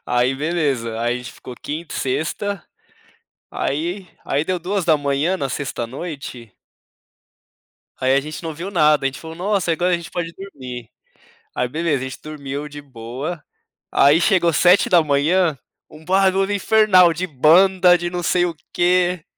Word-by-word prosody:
Aí 125 +2 +1
beleza, 135 -7 -1
aí 120 +1 0
a - - -2
gente 125 -1 -8
ficou 125 - -11
quinta 155 +3 -6
e - - -3
sexta, 160 +9 -2 0.9
aí 175 +6 -3 0.2
aí 145 +3 0
deu 185 -1 -1
2h, 165 -3 0
na 140 -7 -3
sexta 130 -3 -4
à - - -5
noite 130 - -8 1.5
aí 130 0 +3
a 140 - +3
gente 155 +4 -8
não 165 - -4
ouviu 170 +6 -6
nada, 150 -6 +3
a - - +3
gente 135 - -4
falou: 160 0 -9
"Nossa, 190 -1 0
agora 180 +3 0
a - - +2
gente 170 -1 -9
pode 170 -1 -4
dormir". 130 - -9 0.7
Aí 125 - -1
beleza, 150 -2 -1
a - - -4
gente 130 - -10
dormiu 145 -1 -6
de 145 0 -10
boa, 130 +6 -7 0.5
aí 145 +5 +5
chegou 175 -5 +3
7h, 165 -2 +3 0.3
um 155 +1 -15
barulho 195 +1 +2
infernal 200 -4 +5
de 175 +3 -3
banda, 180 +4 +5
de 175 0 -3
não 175 0 -4
sei 175 +1 +2
o 170 -2 -3 0.2
quê 180 -1 +2
160 Hz, 160 wpm, -20 LUFS, 140-180 Hz, 1.5 s, aí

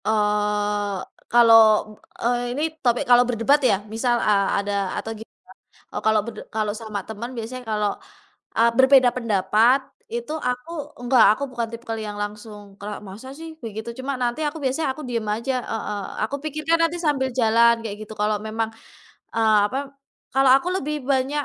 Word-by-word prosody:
Eee, 210 -1 0 0.3
kalau, 230 -1 +7 0.7
eee, 245 +1 0
ini 300 - 0 0.2
topik 240 -1 +1
kalau 245 0 +6
berdebat 250 +5 +3
ya? 255 -7 +3 0.2
Misal 240 +1 +1
a 200 -4 +2
ada, 200 0 -1 0.2
atau 225 - -4
gimana? 220 0 -11 0.6
Oh, - - -3
kalau 220 -1 +3
berde 230 -2 -7
kalau 215 -1 -1
sama 215 -2 -4
teman 220 +2 -6
biasanya 235 +3 -5
kalau, 210 -1 0 0.6
eee, 230 +1 +4
berbeda 260 -1 +6
pendapat 225 +3 +3 0.3
itu 235 +2 -5
aku 250 +3 -3 0.3
enggak, 245 -1 +5
aku 280 - -5
bukan 235 -2 -2
tipikal 230 -1 -5
yang 210 -1 -5
langsung 205 -1 -8
kerak, 205 +1 -6
"Masa 205 +6 -10
sih?" 325 +2 -9 0.2
Begitu. 220 +1 -6
Cuma 265 +2 -3
nanti 245 +1 -2
aku 295 - -4
biasanya 270 +4 0
aku 305 - -9
diem 230 -2 -2
aja 230 +6 -1
heeh. 210 -2 -4 0.2
Aku 220 +6 -2
pikirkan 310 +2 0
nanti 330 +1 -2
sambil 280 -5 +1
jalan 235 -1 +5
kayak 210 -3 -4
gitu. 220 - -8
Kalau 210 0 +1
memang, 220 +1 -3 0.7
eee 220 -2 +4
apa 260 - -3 0.5
kalau 270 0 +4
aku 275 +6 -2
lebih 300 0 -3
banyak 275 +2 0
230 Hz, 165 wpm, -23 LUFS, 210-260 Hz, 0.7 s, kalau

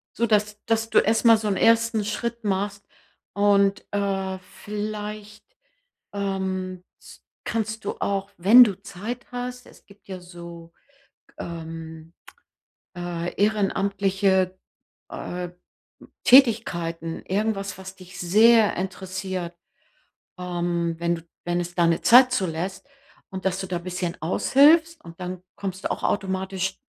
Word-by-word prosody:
So 235 - +1
dass 210 -1 0
dass 225 0 +1
du - - +6
erstmal 225 +1 +4
so 215 0 -3
'n 195 - 0
ersten 230 -1 +3
Schritt 235 +3 -3
machst 200 0 -2 0.5
und, 200 -1 +3
äh, 195 -2 -1 0.3
vielleicht, 210 0 -6 0.7
ähm, 190 -2 -3 0.2
s - - -16 0.2
kannst 220 -1 -3
du - - -3
auch, 195 0 -1
wenn 215 +8 +9
du 200 -6 -1
Zeit 215 +5 -7
hast 250 0 -5
es - - -19
gibt 200 0 -21
ja 190 -2 -6
so, 170 -1 -11 0.7
ähm, 165 -1 -8 0.8
äh, 175 -1 -4
ehrenamtliche, 195 -2 +1 0.5
äh, 180 0 -5 0.7
Tätigkeiten, 170 - +3
irgendwas, 200 -1 -1
was 190 0 -9
dich 185 -1 -13
sehr 215 +4 +5
interessiert. 185 -1 -4 0.8
Ähm, 175 -2 -2
wenn 170 0 0
du 165 - -10 0.2
wenn 175 0 0
es 175 0 -5
deine 170 -1 +2
Zeit 250 +1 +7
zulässt 190 - -3 0.4
und 190 -1 -7
dass 190 0 0
du 190 - -4
da 180 -1 -3
bisschen 180 0 -4
aushilfst, 310 - +4
und 165 +1 -12
dann 180 0 -5
kommst 190 -1 -5
du - - -1
auch - - -3
automatisch 190 -1 -2
195 Hz, 125 wpm, -24 LUFS, 180-210 Hz, 0.8 s, wenn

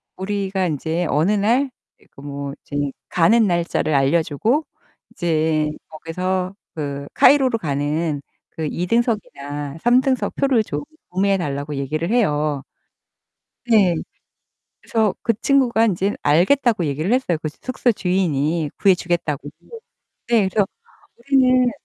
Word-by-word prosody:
우리가 190 -1 -2
인제 160 +3 -2
어느 160 +8 +2
날 235 +7 +2 0.3
그러니까 135 - -18
뭐 140 -1 -5
이제 145 -1 -2 0.2
가는 220 +6 +4
날짜를 170 -3 0
알려 140 +4 +3
주고 230 - 0 0.5
이제 155 -2 0 0.2
거기서 180 +4 -3 0.2
그 140 -2 -5
카이로로 265 -5 +5
가는 145 0 -1 0.3
그 160 - -5
2 175 +1 -3
등석이나 145 - -2
3 245 +2 +5
등석 260 -2 0
표를 260 -5 +2
좀 - - -4 0.3
구매해 195 +2 +1
달라고 145 -3 -3
얘기를 155 +6 -2
해요. 150 - +1 1.1
네. 200 -7 +5 0.9
그래서 220 -4 0
그 230 - +2
친구가 245 -5 +3
인제 195 0 0
알겠다고 190 - +3
얘기를 155 - -1
했어요, 245 -11 +1
그 155 - -1
숙소 250 - -1
주인이. 170 -6 0
구해 195 -2 +5
주겠다고. 165 -5 -2 0.8
네. 220 -5 +3
그래서 200 +1 +1 0.5
우리는 255 -1 +3
180 Hz, 265 characters per minute, -21 LUFS, 150-225 Hz, 1.1 s, 카이로로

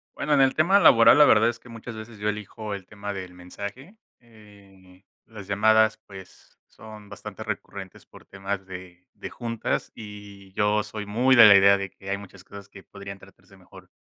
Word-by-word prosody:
Bueno, 150 - 0
en 140 - +4
el 135 0 +3
tema 175 +6 +3
laboral, 115 - +6
la 150 - +7
verdad 115 -3 +4
es 120 - -5
que 125 - -18
muchas 115 0 -9
veces 110 0 -11
yo 105 +1 -1
elijo 105 0 -6
el 95 -2 -10
tema 100 -1 -7
del 95 -2 -8
mensaje, 100 - -10 0.2
eh, 100 -5 -20 0.2
las 105 -4 -12
llamadas, 110 +2 +3
pues, 95 -2 -15
son 110 -2 -14
bastante 100 - -10
recurrentes - - -8
por - - -18
temas 95 0 -6
de 90 -1 -12
de - - -8
juntas 115 -1 -4
y 105 -2 -12
yo 105 +1 +1
soy 105 0 -8
muy 125 +5 +2
de 120 -2 +9
la 100 - +8
idea 100 0 +6
de 100 0 -5
que 95 +1 -13
hay 100 - -1
muchas 100 -2 -14
cosas 100 0 -13
que 95 -1 -15
podrían 100 -1 -11
tratarse - - -20
mejor - - -17
105 Hz, 195 wpm, -24 LUFS, 100-110 Hz, 0.2 s, de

